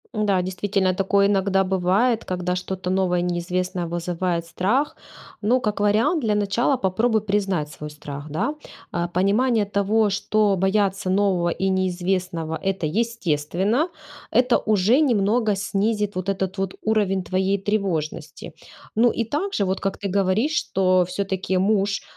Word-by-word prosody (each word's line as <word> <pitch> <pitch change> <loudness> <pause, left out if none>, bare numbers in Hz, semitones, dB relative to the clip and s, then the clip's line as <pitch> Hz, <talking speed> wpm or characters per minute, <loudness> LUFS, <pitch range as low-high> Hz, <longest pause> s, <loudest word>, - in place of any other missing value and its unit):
Да, 205 -3 +2
действительно, 190 0 0
такое 200 +1 +2
иногда 195 -1 +2
бывает, 195 +6 +1
когда 180 0 -2
что-то 185 0 -4
новое 185 -1 +1
и - - 0
неизвестное 180 +1 -2
вызывает 170 0 -2
страх. 200 - 0 0.5
Ну, 240 +5 +3
как 210 -4 -2
вариант, 215 - +2
для 210 -2 +1
начала 210 +6 +1
попробуй 220 +2 +1
признать 195 -7 -1
свой 150 -1 -8
страх, 150 0 -8
да. 225 - -1 0.4
Э, 175 0 -1
понимание 210 +5 +2
того, 205 +2 +1
что 205 0 +1
бояться 195 0 0
нового 185 -3 +2
и 190 +3 -1
неизвестного- 180 -3 -1
это 195 -4 -1
естественно, 200 - 0 0.4
это 245 +1 +4
уже 215 +6 +3
немного 220 -4 +2
снизит 205 +1 -1
вот 185 +1 -3
этот 190 0 -2
вот 190 -1 -2
уровень 200 -4 +1
твоей 190 +2 0
тревожности. 175 -6 -3 0.4
Ну, 235 +2 +4
и 230 - -2
также, 295 - -1
вот 190 0 -2
как 195 - -2
ты 200 - -4
говоришь, 200 +9 +1
что 185 -9 +2
всё-таки 190 0 -2
муж, 200 +1 +1
195 Hz, 140 wpm, -23 LUFS, 180-210 Hz, 0.5 s, это